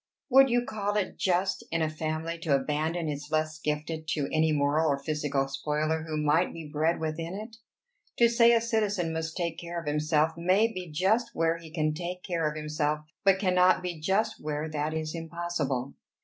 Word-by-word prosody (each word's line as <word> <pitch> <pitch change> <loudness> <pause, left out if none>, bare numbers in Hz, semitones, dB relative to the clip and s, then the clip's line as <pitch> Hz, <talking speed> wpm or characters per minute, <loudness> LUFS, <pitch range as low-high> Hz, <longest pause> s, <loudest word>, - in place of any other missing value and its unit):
Would 270 +1 +7
you 245 0 +2
call 205 -2 -2
it 205 - -1
just 185 +1 +1
in 165 -1 0
a - - +2
family 155 +1 -3
to 160 -4 +2
abandon 155 +4 -1
its 145 0 -4
less 155 0 0
gifted 155 +1 -3
to 150 -2 -1
any 155 0 +3
moral 150 +2 +2
or 140 - +2
physical 145 -2 -1
spoiler 155 +3 -1
who 155 -1 -2
might 150 +4 +2
be 165 -2 -8
bred 155 +3 0
within 165 +3 -3
it? 220 +2 -8 0.6
To 235 - +6
say 235 0 +5
a 230 - +4
citizen 210 -7 0
must 160 0 -3
take 170 -2 -2
care 170 0 -5
of 165 - -9
himself 150 +1 +2
may 190 +7 +2
be 180 -3 -6
just 190 +10 +1
where 165 0 +1
he 165 -1 -11
can 155 -1 0
take 180 +3 -5
care 165 -4 0
of 150 - -7
himself, 150 0 -1 0.2
but 195 -1 +5
cannot 185 -2 +3
be 175 -3 -4
just 210 +7 0
where 150 +1 -2
that 155 +1 -2
is 155 -1 -3
impossible. 165 -6 -3
160 Hz, 190 wpm, -28 LUFS, 155-180 Hz, 0.6 s, Would